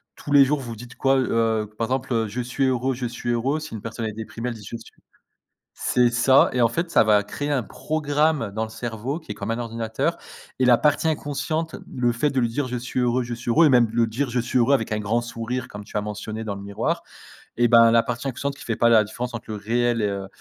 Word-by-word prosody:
tous 145 - -8
les 140 -1 +7
jours 140 +1 0
vous 120 -2 -6
dites 125 +3 -11
quoi 135 0 +2
heu, 115 -4 +1
par 115 0 -1
exemple 130 0 -2
heu: 115 -1 +1
«Je 110 +5 -5
suis 125 +3 -1
heureux, 130 +1 0
je 125 0 -4
suis 120 0 -5
heureux», 130 +6 0
si 155 - -8
une 105 - -7
personne 115 0 -5
elle 110 - -2
est - - -12
déprimée 115 +2 -6
elle 120 - -5
dit: 105 - -11
«je 115 - -6
suis» - - -15 0.8
c'est 120 -1 +2
ça, 130 +3 +5
et 125 - +1
en 115 - +6
fait 170 +8 -2
ça - - +5
va 105 -1 +4
créer 145 +8 -4
un 135 -5 +1
programme 150 -2 0
dans 110 +2 -2
le 110 - -5
cerveau 120 +6 -4
qui 160 - -9
est - - -5
comme 100 - -5
un 115 - 0
ordinateur 115 -2 -2 0.4
et 130 - +3
la 120 -2 +6
partie 150 +2 +2
inconsciente, 155 +1 -2 0.2
le 120 -1 +1
fait 145 +5 +1
de 135 -1 0
lui 120 - +2
dire: 130 +3 -2
«Je 125 0 -3
suis 125 +1 -4
heureux, 125 0 +1
je 120 0 -5
suis 120 0 -6
heureux» 160 +8 +5
et - - +3
même 120 -4 +5
le 115 0 +2
dire: 120 +4 -2
«Je 125 +1 0
suis 120 +2 0
heureux» 125 +4 +4
avec 115 -4 -2
un 110 - 0
grand 110 +3 0
sourire 120 +2 -4
comme 105 0 -9
tu 105 - -6
as 105 - 0
mentionné 105 +1 -5
dans 105 -2 -3
le 100 - -8
miroir 110 +13 -2 0.6
et 120 0 +4
ben 115 0 +7
la 115 0 +5
partie 125 +2 -4
inconsciente 140 +2 -3
qui - - -12
fait 115 - -1
pas 115 - +3
la 110 -2 +6
différence 120 +4 -5
entre 115 - -7
le 110 - -3
réel 120 +2 0
et 105 - +1
heu 100 -1 -4
120 Hz, 270 wpm, -23 LUFS, 115-130 Hz, 0.8 s, les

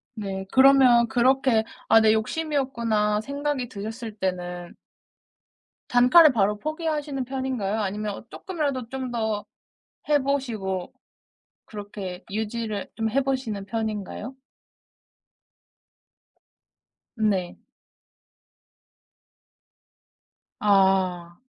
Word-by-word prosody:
네. 195 -2 -5
그러면 260 -3 +6
그렇게 250 -1 +3 0.2
'아 225 - +6
내 220 0 +5
욕심이었구나.' 230 -5 0
생각이 280 -1 -3
드셨을 220 +1 -7
때는 180 -2 -4 1.1
단칼에 250 +7 +7
바로 210 -3 +1
포기하시는 305 -3 -3
편인가요? 255 -6 -2
아니면 205 0 -3
쪼끔이라도 285 -10 -3
좀 260 -1 -5
더 220 -3 -2 0.6
해 295 -1 +4
보시고 225 -10 -2 0.7
그렇게 200 -3 -7
유지를 220 -1 -3
좀 225 -1 -1
해 275 - +2
보시는 255 -7 -2
편인가요? 220 +2 -4 2.8
네. 200 -5 -1 3.0
아. 190 -4 +2
225 Hz, 190 characters per minute, -25 LUFS, 205-265 Hz, 3.0 s, 단칼에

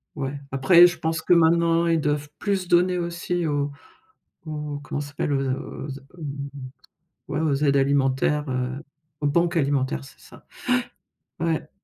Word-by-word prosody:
ouais, 140 0 -4
après 170 +6 +7
je 175 - -4
pense 160 -1 -1
que 175 - +3
maintenant, 170 0 +4
ils 165 -2 +2
doivent 145 0 -1
plus 195 -3 -1
donner 180 +1 +3
aussi 170 0 -2
aux 145 -1 0 0.7
aux 150 -2 -5
comment 145 - -3
ça 145 - -7
s'appelle? 145 0 -2
Aux 135 -1 0
a - - +1
aux 140 +1 -6 0.3
hem, 140 -2 -5 0.8
ouais, - - -1
aux 155 -3 +1
aides 140 -1 +4
alimentaires, 140 +1 +2
heu, 130 +2 -2 0.4
aux 145 - +2
banques 170 +4 +2
alimentaires, 135 - 0
c'est - - -15
ça. - - -16 0.9
Ouais, 165 - -1
ouais. - - -4
150 Hz, 160 wpm, -24 LUFS, 140-170 Hz, 0.9 s, après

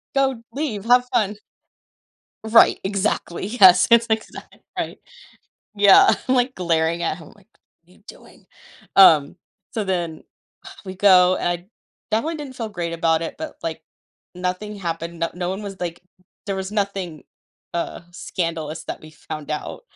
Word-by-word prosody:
go, 265 -4 +1
leave, 260 -9 -3
have 245 +1 +5
fun." 205 -2 +1 1.1
Right, 225 +1 +5
exactly, 195 -2 -2
yes, 190 -5 +6
that's 235 0 +6
exactly 220 0 -4 0.2
right. - - -4 0.8
Yeah, 200 -1 +6
I'm, 260 - +3
like, 250 +1 +1
glaring 170 -1 0
at 165 0 -1
him, 160 - -13
like, 205 +1 -24 0.4
"What 175 - -28
are - - -20
you - - -27
doing?" - - -15 0.5
Um, 155 -7 +6 0.4
so, 220 -2 -2
then, 175 -4 -3 0.6
we 190 0 -7
go 185 -2 +5
I 175 +1 -2 0.4
definitely 310 +10 0
didn't 280 -4 -8
feel 225 -2 -4
great 170 -4 -4
about 165 -1 +1
it, 165 - -5
but, 315 -1 -7
like, 160 -1 -4 0.5
nothing 185 +4 -4
happened, 170 -2 -5
no 165 - 0
no 180 0 -3
one 195 +3 -5
was 195 -2 -8
like, 175 -1 -4 0.5
there 195 -1 -2
was 190 +1 -4
nothing, 195 -6 -3 0.5
uh, 170 - -3
scandalous 165 -3 -4
that - - -6
we 155 - -12
found 155 -1 -8
out. 150 - -5
185 Hz, 155 wpm, -22 LUFS, 170-215 Hz, 1.1 s, yes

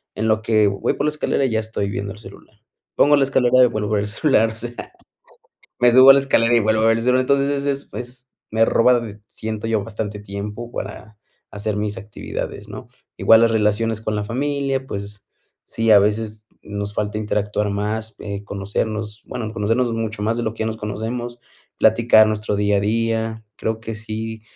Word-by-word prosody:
en 110 - -1
lo 110 0 +2
que 110 -1 +3
voy 100 -1 0
por - - -2
la - - +3
escalera 150 -2 0
ya 110 -4 0
estoy 110 -2 -3
viendo 100 0 -4
el 105 - -14
celular. 105 0 -15 0.4
Pongo 145 +1 +5
la 140 - +3
escalera 130 -1 +4
y - - +6
vuelvo 110 -3 -3
a - - -1
ver 100 - +1
el - - -4
celular, 115 0 +2
o - - -10
sea, 120 +2 -5 1.1
me 120 -1 +5
subo 130 +2 +8
a - - +10
la 140 - +4
escalera 120 -4 +2
y - - +4
vuelvo 110 0 +2
a - - +4
ver 115 0 +4
el 115 - -2
celu, 125 +1 +3
entonces, 140 +2 +2
es 140 0 -2
es 140 0 -2
es 125 +1 -8 0.2
me 110 +1 +3
roba 120 +2 +4
d 105 -2 -9
siento 110 0 -5
yo, 110 -3 0
bastante 105 -1 -5
tiempo 105 +4 -7
para 105 +1 -7 0.3
hacer 105 +1 -3
mis 105 0 -2
actividades, 105 0 -6
¿no?, - - -9 0.3
igual 115 0 +6
las 115 - +4
relaciones 110 0 +1
con 110 -1 -2
la 105 - -2
familia, 135 +3 -2
pues, 100 -2 -7 0.4
sí, 115 0 -1
a 105 - +9
veces 105 +1 -2 0.2
nos 100 0 -5
falta 105 0 -2
interactuar 105 -1 -1
más, 110 +2 -3
eh, 100 -1 -5
conocernos, 105 +2 -4
bueno, 110 -3 -5
conocernos 115 +3 0
mucho 110 -2 -3
más, 115 +2 0
de 120 - -2
lo 110 - -2
que - - -13
ya 110 - 0
nos 110 0 -3
conocemos, 115 +3 -5 0.4
platicar 115 -2 +5
nuestro 105 -1 -1
día 105 0 +2
a - - +1
día. 110 +1 -1
Creo 110 0 -2
que 115 0 -6
sí 110 0 -6
110 Hz, 205 wpm, -21 LUFS, 105-115 Hz, 1.1 s, a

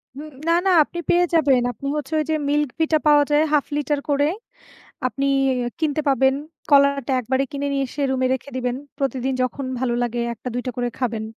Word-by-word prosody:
হুম, 300 +2 -8 0.2
না, 335 - +4
না, 380 - +4
আপনি 345 - -8
পেয়ে 355 +1 +4
যাবেন। 275 -6 +4
আপনি 275 +5 -7
হচ্ছে 300 +1 -4
ঐ - - +2
যে 315 - +2
মিল্ক 295 -2 +1
ভিটা 320 -1 +3
পাওয়া 295 -1 +6
যায় 295 +1 +4
হাফ 295 -2 +3
লিটার 295 0 0
করে 285 +1 +2 0.8
আপনি 275 +3 -2 0.5
কিনতে 310 -1 0
পাবেন, 265 0 +3 0.4
কলাটা 280 -2 +4
একবারে 260 +3 0
কিনে 285 0 -3
নিয়ে 275 -1 0
এসে 285 - -5
রুমে 260 -1 +1
রেখে 265 +2 -7
দিবেন। 250 0 -1 0.2
প্রতিদিন 265 -1 -1
যখন 255 +2 -2 0.2
ভালো 245 -2 0
লাগে 240 0 -2
একটা 250 - -7
দুইটা 245 +1 -2
করে 245 0 -1
খাবেন। 225 -4 -2
275 Hz, 190 wpm, -22 LUFS, 255-295 Hz, 0.8 s, পাওয়া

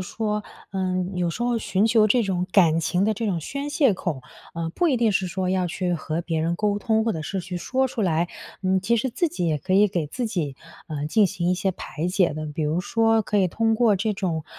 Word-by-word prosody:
说， 210 +2 -2 0.3
呃， 185 -1 -1 0.2
有 180 -1 0
时 170 +8 -3
候 240 -1 +1
寻 205 -1 +1
求 220 -1 +4
这 240 +3 +3
种 185 -3 -1
感 165 -4 +4
情 180 +3 +1
的 220 - +2
这 220 +2 -3
种 185 -5 0
宣 280 - -4
泄 285 -5 +3
口， 175 -7 -3 0.3
呃， 165 0 -3
不 345 - +1
一 270 - +2
定 225 -3 +2
是 190 -1 +1
说 185 +1 -2
要 185 -1 +1
去 180 +1 -2
和 165 0 -2
别 165 -2 -1
人 170 +2 0
沟 205 0 0
通 220 +1 +1
或 225 - +1
者 160 - -4
是 190 +5 -3
去 180 0 -6
说 265 +9 0
出 240 - -5
来， 175 -3 +1 0.3
嗯， 190 0 +2
其 235 +5 +2
实 250 +3 -1
自 330 +9 0
己 180 - -2
也 155 -2 +1
可 185 +6 -1
以 205 +2 +6
给 170 -5 -2
自 245 - -3
己， 160 -11 -3 0.3
呃， 150 -2 -3
进 205 +6 +4
行 180 -2 -1
一 - - +3
些 190 +2 0
排 165 -1 -5
解 180 -2 +2
的。 155 +1 -5
比 150 +1 -4
如 155 +4 0
说 225 +2 +2
可 210 0 -2
以 190 - +4
通 225 +5 +1
过 220 -2 +4
这 210 +2 -1
种， 170 -6 -2
190 Hz, 265 characters per minute, -24 LUFS, 170-220 Hz, 0.3 s, 以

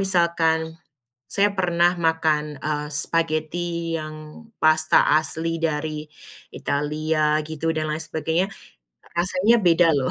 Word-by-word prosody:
misalkan 165 -3 +1 0.5
saya 200 0 +2
pernah 175 -2 +2
makan, 160 -3 +1
eee, 150 +1 -3
spaghetti 165 +2 -2
yang 155 -1 -6 0.5
pasta 155 0 +4
asli 160 +1 -1
dari 155 -1 -2 0.5
Italia 150 +1 0
gitu 160 +1 -2
dan 155 -1 -2
lain 160 - -4
sebagainya, 160 +3 -1 0.7
rasanya 185 +6 +3
beda 175 -1 +4
loh. 130 -2 0
160 Hz, 105 wpm, -23 LUFS, 155-170 Hz, 0.7 s, pasta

